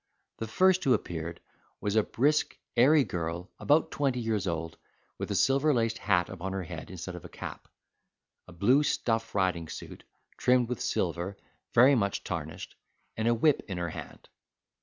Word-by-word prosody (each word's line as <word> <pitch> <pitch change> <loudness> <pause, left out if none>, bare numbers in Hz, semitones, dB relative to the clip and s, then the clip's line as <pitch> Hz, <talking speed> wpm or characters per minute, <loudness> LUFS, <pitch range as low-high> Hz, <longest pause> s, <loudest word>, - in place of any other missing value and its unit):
The 115 - -3
first 185 +10 +3
who 130 -3 +5
appeared 85 -4 -5 0.4
was 105 0 -2
a 110 - +6
brisk, 145 +8 +1 0.2
airy 140 +5 +6
girl, 85 -2 -4
about 150 +2 +3
twenty 135 -4 0
years 110 -4 -1
old, 80 -1 -3 0.4
with - - -4
a - - -1
silver 140 +2 +3
laced 115 -1 0
hat 90 -4 +2
on 95 0 -5
her 95 -1 -2
head 80 -1 -8
instead 90 0 -6
of 90 - -9
a - - -10
cap, - - -8 0.8
a - - -12
blue 105 - +4
stuff 115 -6 -1
riding 90 -4 +1
suit, - - -9 0.3
trimmed 125 -1 +3
with 125 -5 -3
silver 90 +3 -1 0.4
very 130 +4 +7
much 100 -6 0
tarnished, - - -5 0.4
and 110 +1 -1
a 120 - +4
whip 150 +5 +3
in 95 -4 -4
her 85 -1 -2
hand. - - -9
110 Hz, 170 wpm, -29 LUFS, 90-130 Hz, 0.8 s, very